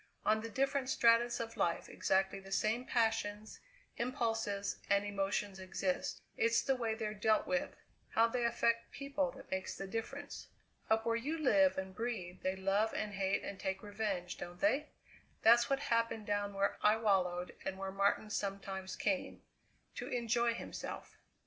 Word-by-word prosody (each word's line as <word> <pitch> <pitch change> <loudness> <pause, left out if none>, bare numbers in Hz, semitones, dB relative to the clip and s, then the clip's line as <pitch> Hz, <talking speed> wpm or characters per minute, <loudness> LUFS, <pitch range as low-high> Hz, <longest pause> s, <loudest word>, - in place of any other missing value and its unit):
On 215 0 +3
the 230 - -5
different 270 +2 0
stratas 235 -1 +4
of 230 0 -4
life 170 - 0
exactly 190 +1 +1
the 195 0 -12
same 220 +5 +1
passions, 220 -3 0 0.4
impulses, 225 -5 -1
and 200 +1 +3
emotions 200 -1 -1
exist; 185 0 -2
it's 230 0 +3
the 270 - +2
way 230 -3 -1
they're 215 -2 -3
dealt 215 +1 +2
with, 275 +1 -1 0.3
how 225 - +4
they 240 +1 -1
affect 235 0 +1
people, 280 0 -1
that 270 - -13
makes 190 0 -2
the 195 - -4
difference. 230 +8 -5 0.4
Up 220 0 +3
where 230 0 +2
you 285 +8 -2
live 285 -1 +4
and 190 0 -4
breathe 185 -6 -4
they 185 0 0
love 195 +3 +1
and 210 -1 -2
hate 195 0 0
and 195 - -6
take 190 +1 -3
revenge, 205 -4 -3
don't 175 0 -7
they? 300 0 +2 0.6
That's 235 +2 +7
what 275 - +3
happened 230 -5 0
down 205 -1 -1
where 195 0 0
I 210 +1 +5
wallowed 180 -5 +1
and 190 - -3
where 195 0 -4
Martin 200 +2 +1
sometimes 195 -2 -3
came 280 -2 -1 0.5
to - - -5
enjoy 235 -1 +1
himself!" - - -6
220 Hz, 160 wpm, -35 LUFS, 195-235 Hz, 0.6 s, That's